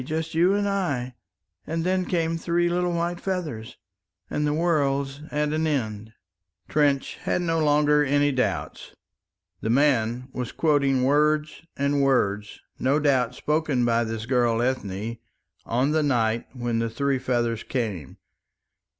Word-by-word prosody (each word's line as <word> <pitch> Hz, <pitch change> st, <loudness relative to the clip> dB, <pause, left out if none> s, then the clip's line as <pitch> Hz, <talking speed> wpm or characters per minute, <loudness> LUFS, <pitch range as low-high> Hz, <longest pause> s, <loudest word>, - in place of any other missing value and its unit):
just 160 Hz, +4 st, -3 dB
you 175 Hz, +4 st, +3 dB
and 205 Hz, 0 st, 0 dB
I. 145 Hz, -11 st, -1 dB, 0.5 s
And 165 Hz, +1 st, -2 dB
then 185 Hz, +1 st, +1 dB
came 165 Hz, -2 st, 0 dB
three 170 Hz, +1 st, 0 dB
little 175 Hz, 0 st, 0 dB
white 170 Hz, 0 st, -1 dB
feathers; 150 Hz, -, -4 dB, 0.5 s
and 150 Hz, 0 st, 0 dB
the 150 Hz, -, +1 dB
world's 140 Hz, -4 st, 0 dB
at 150 Hz, 0 st, -1 dB
an 160 Hz, +1 st, 0 dB
end." 110 Hz, -7 st, -3 dB, 0.5 s
Trench 145 Hz, -2 st, +1 dB
had -, -, -1 dB
no 165 Hz, -2 st, 0 dB
longer 150 Hz, -1 st, +3 dB
any 145 Hz, +1 st, +2 dB
doubts. 125 Hz, -9 st, -3 dB, 0.7 s
The 110 Hz, -, -2 dB
man 125 Hz, -2 st, +2 dB
was 125 Hz, -2 st, -4 dB
quoting 140 Hz, -4 st, +2 dB
words, 150 Hz, +2 st, +2 dB, 0.2 s
and 140 Hz, 0 st, +1 dB
words, 105 Hz, -7 st, 0 dB, 0.2 s
no 135 Hz, +3 st, +2 dB
doubt, 130 Hz, -5 st, +1 dB
spoken 150 Hz, -5 st, 0 dB
by 120 Hz, 0 st, +2 dB
this 110 Hz, -1 st, -4 dB
girl 120 Hz, -2 st, +2 dB
Ethne 115 Hz, -3 st, -2 dB, 0.5 s
on 125 Hz, +5 st, +1 dB
the 155 Hz, 0 st, +2 dB
night 120 Hz, -5 st, +1 dB
when 120 Hz, -3 st, -2 dB
the 115 Hz, 0 st, -1 dB
three 135 Hz, +3 st, 0 dB
feathers 120 Hz, -3 st, -1 dB
came. 105 Hz, -, -4 dB
140 Hz, 140 wpm, -25 LUFS, 120-155 Hz, 0.7 s, you